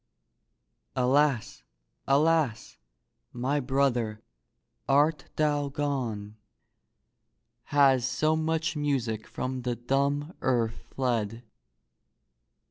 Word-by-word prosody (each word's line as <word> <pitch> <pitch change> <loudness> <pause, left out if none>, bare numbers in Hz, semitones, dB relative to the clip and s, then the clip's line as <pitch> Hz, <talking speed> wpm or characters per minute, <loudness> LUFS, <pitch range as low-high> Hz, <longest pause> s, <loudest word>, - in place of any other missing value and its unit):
Alas! 130 -1 +2 0.5
alas! 145 -4 +2 0.5
my 130 +4 -1
brother, 125 -5 0 0.7
art 145 +1 +3
thou 145 -2 +1
gone? 125 -8 -3 1.3
Has 135 -3 +4
so 155 +5 +1
much 160 +1 -1
music 130 -7 -1
from 130 0 -4
the 120 -1 -2
dumb 140 - 0
earth 115 -3 0
fled? 115 -3 -1
135 Hz, 75 wpm, -28 LUFS, 120-145 Hz, 1.3 s, Has